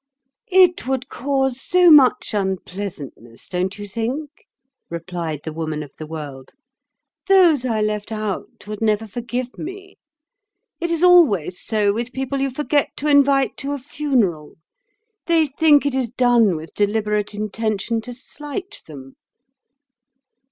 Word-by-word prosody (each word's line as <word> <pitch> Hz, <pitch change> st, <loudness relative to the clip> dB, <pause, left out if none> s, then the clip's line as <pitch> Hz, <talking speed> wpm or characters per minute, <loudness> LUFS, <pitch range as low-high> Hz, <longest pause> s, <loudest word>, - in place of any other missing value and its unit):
"It 365 Hz, -6 st, +4 dB
would 260 Hz, -1 st, -2 dB
cause 265 Hz, -1 st, -1 dB
so 360 Hz, +1 st, +5 dB
much 270 Hz, -6 st, +5 dB
unpleasantness, 185 Hz, -, -5 dB
don't 185 Hz, +2 st, -2 dB
you 205 Hz, 0 st, -7 dB
think?" 245 Hz, +8 st, -3 dB, 0.6 s
replied 170 Hz, -3 st, -5 dB
the 160 Hz, -, -6 dB
Woman 155 Hz, -1 st, -4 dB
of 145 Hz, -, -13 dB
the 155 Hz, -, -7 dB
World. 145 Hz, -4 st, -8 dB, 0.7 s
"Those 350 Hz, -9 st, +5 dB
I 225 Hz, -3 st, 0 dB
left 210 Hz, 0 st, -2 dB
out 215 Hz, -3 st, -5 dB
would 210 Hz, 0 st, -7 dB
never 215 Hz, 0 st, +1 dB
forgive 240 Hz, +3 st, -5 dB
me. 385 Hz, +3 st, -9 dB, 0.8 s
It 340 Hz, -, -2 dB
is 335 Hz, 0 st, 0 dB
always 255 Hz, -, +4 dB
so 210 Hz, -2 st, +1 dB
with 240 Hz, +3 st, -4 dB
people 265 Hz, +1 st, -3 dB
you 275 Hz, -, +1 dB
forget 290 Hz, +2 st, 0 dB
to 295 Hz, -, -3 dB
invite 280 Hz, -2 st, +3 dB
to 280 Hz, +1 st, -4 dB
a -, -, -2 dB
funeral—they 290 Hz, -, -2 dB
think 290 Hz, 0 st, +3 dB
it 285 Hz, -, 0 dB
is 260 Hz, -3 st, -1 dB
done 240 Hz, -5 st, +3 dB
with 160 Hz, +1 st, -8 dB
deliberate 210 Hz, 0 st, -1 dB
intention 215 Hz, +1 st, -2 dB
to 245 Hz, +2 st, -8 dB
slight 300 Hz, +10 st, -8 dB
them." 135 Hz, -4 st, -12 dB
235 Hz, 135 wpm, -21 LUFS, 195-285 Hz, 0.8 s, so